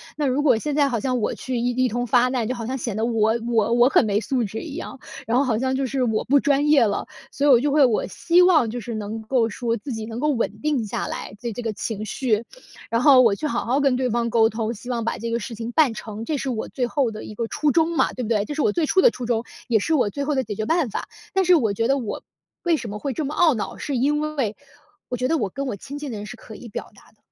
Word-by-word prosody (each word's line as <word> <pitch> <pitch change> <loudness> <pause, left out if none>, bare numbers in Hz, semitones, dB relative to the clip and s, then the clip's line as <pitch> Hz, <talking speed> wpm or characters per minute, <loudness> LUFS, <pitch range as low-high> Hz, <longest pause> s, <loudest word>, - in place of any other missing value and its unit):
那 300 - -1
如 265 +1 +1
果 265 -6 +4
现 290 +5 -3
在 290 -2 +3
好 235 -3 -1
像 255 +2 -1
我 215 - -1
去 255 -2 -3
一 245 - 0
一 255 - +4
通 245 +2 -2
发 245 +2 +4
难， 250 -4 -1
就 255 - -2
好 230 -2 -5
像 260 - -3
显 230 -3 -3
得 220 - 0
我 225 -1 +2
我 230 -2 +2
我 240 +2 +5
很 260 - +4
没 205 -1 +1
素 245 +1 -1
质 215 +1 -5
一 310 - -7
样， 270 - -7 0.3
然 235 +2 +2
后 275 - +4
好 230 -4 0
像 260 0 0
就 270 0 0
是 265 +1 -2
我 220 -3 0
不 285 +2 +4
专 285 +1 +2
业 295 -4 +6
了。 205 -3 0 0.3
所 280 - -1
以 - - +5
我 245 - +7
就 290 +1 +1
会 290 -1 +5
我 235 -4 +1
希 345 - +3
望 345 -9 +5
就 245 - -4
是 235 +1 -5
能 215 +1 -5
够 230 +1 +1
说， 230 +1 -2
自 245 +4 -6
己 220 -1 -5
能 225 +1 -6
够 300 +3 +1
稳 230 -4 -2
定 295 -6 0
下 - - -3
来， - - -5
对 235 -1 -4
这 245 - -5
个 230 -2 -2
情 215 0 -4
绪。 215 +5 -7 0.7
然 230 +1 +1
后 270 -2 +7
我 225 -5 +4
去 305 - -5
好 240 -4 -2
好 255 +4 +1
跟 275 -3 +3
对 255 -1 0
方 235 +1 0
沟 225 -1 +4
通， 225 +1 -2
希 240 +3 -10
望 235 -2 -1
把 230 - -2
这 230 - -4
个 230 0 0
事 235 - -6
情 225 +1 -5
办 285 -6 +4
成， 215 0 -7
这 290 +5 -2
是 270 - -3
我 230 -3 -3
最 250 -3 -1
后 260 -3 0
的 215 - -8
一 215 - -9
个 230 - -2
初 300 +6 0
衷 330 +1 +2
嘛， - - +2
对 255 - -4
不 220 - -4
对？ 210 -3 +1
这 295 - -5
是 300 - -1
我 210 - +3
最 320 +8 0
初 375 +5 +3
的 - - +6
初 250 - -6
衷， 235 -1 0 0.2
也 230 - +3
是 270 +10 0
我 250 -8 +2
最 280 +8 -4
后 295 +1 0
的 265 - +2
解 210 -1 -5
决 215 +1 -3
办 325 -4 +1
法。 - - -5 0.2
但 385 -1 +3
是 360 0 +5
我 225 -10 +2
觉 225 +3 -1
得 275 - +2
我 235 -6 -5 0.4
为 340 -2 +2
什 235 - -6
么 205 - -5
会 275 +6 -3
这 305 +3 -3
么 290 - -4
懊 335 -4 +5
恼， 220 - -4
是 280 -3 -3
因 295 +4 +1 0.2
为， 220 -6 0 0.5
我 250 - -2
觉 250 +1 0
得 325 +2 +1
我 205 -5 -1
跟 275 0 -3
我 240 - -3
亲 275 +8 -8
近 290 -2 -6
的 220 - -5
人， 205 - -6
是 245 +3 -9
可 220 - -12
以 235 - -10
表 - - -6
达 - - -20
的， 215 - -34
245 Hz, 330 characters per minute, -23 LUFS, 225-280 Hz, 0.7 s, 我